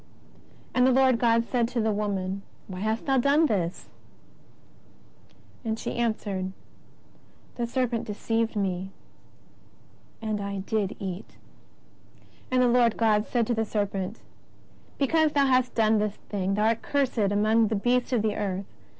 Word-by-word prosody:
And 250 0 +4
the - - +5
Lord 260 -2 +4
God 230 -1 +3
said 235 -1 +1
to 245 0 -3
the 220 -1 +1
woman: 200 -2 -2 0.3
WTiy 185 - -6
hast 220 +3 -1
thou 270 -1 +3
done 285 +5 +4
this? 185 - -1 1.8
And 220 -1 -2
she - - -4
answered: 205 -5 -2 1.0
The 240 -1 -3
serpent 240 -2 -1
deceived 225 +2 -1
me, 190 -2 -1 1.3
and 215 -2 -2
I 200 -1 -3
did 205 0 -1
eat. 190 0 -6 1.1
And 255 0 +3
the - - +4
Lord 240 -2 +3
God 215 -2 +2
said 240 -2 +1
to 240 - 0
the 225 -1 0
serpent: 205 -1 -3 0.8
Because 310 +2 +2
thou 280 -1 +4
hast 255 -1 +2
done 220 -1 +3
this 210 -1 -1
thing, 195 -1 -3
thou 210 +1 +1
art 230 0 0
cursed 275 -4 0
among 215 +2 +3
all 220 - +1
beasts 245 +4 +1
of 235 -4 +1
the 215 -2 0
earth. 195 -1 -2
220 Hz, 150 wpm, -27 LUFS, 205-245 Hz, 1.8 s, the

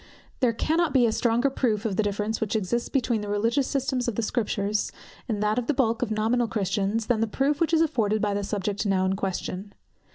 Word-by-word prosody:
There 250 -3 +3
cannot 315 +6 0
be 250 -2 +6
a 225 - +2
stronger 240 +4 +1
proof 225 -5 0
of 205 -4 0
the 220 - +2
difference 210 +2 -2
which 220 0 -1
exists 220 +3 -1
between 240 -5 0
the 205 - -5
religious 230 +6 +1
system 265 -2 -1
of 235 - -1
the 230 - -1
Scriptures, 210 -2 -1 0.4
and 210 -2 -1
that 210 +3 +2
of 245 - -5
the 300 - +1
bulk 230 -4 +1
of - - 0
nominal 225 +3 +1
Christians, 205 +1 -1
than 235 -1 +1
the 225 - +2
proof 280 +7 0
which 330 -1 +2
is 325 -1 +4
afforded 220 -9 +1
by 205 -1 0
the 200 0 -1
subject 200 0 -2
now 195 -3 +1
in 190 +1 +1
question. 195 +1 -4
220 Hz, 225 wpm, -26 LUFS, 205-245 Hz, 0.4 s, be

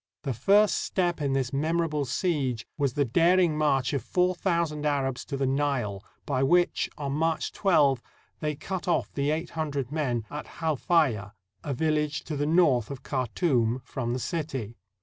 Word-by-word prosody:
The 135 -4 -1
first 200 - +4
step 175 -4 -1
in 140 -2 0
this 135 -2 -1
memorable 155 0 0
siege 130 - -1
was 140 -4 0
the 145 0 +1
daring 170 +5 +3
march 140 -4 +1
of 140 - 0
four 180 0 +1
thousand 170 -5 -1
Arabs 135 -3 0
to 140 - -4
the 135 - 0
Nile, 130 -8 -1 0.2
by 135 -3 0
which, 175 +6 +2
on 140 -3 -3
March 160 +2 0
12, 145 - +3 0.4
they 150 -1 -2
cut 185 +5 -5
off 170 -3 0
the 140 0 0
eight 160 +3 -2
hundred 145 -5 -3
men 125 -8 -1
at 150 - -6
Halfaya, 150 - +1 0.3
a 140 -3 -3
village 150 0 0
to 155 - -5
the 145 +1 -1
north 155 -9 +3
of 135 -2 -7
Khartoum, 125 - 0
from 120 -2 -3
the 125 - -2
city. 135 -7 -4
145 Hz, 170 wpm, -27 LUFS, 130-165 Hz, 0.4 s, first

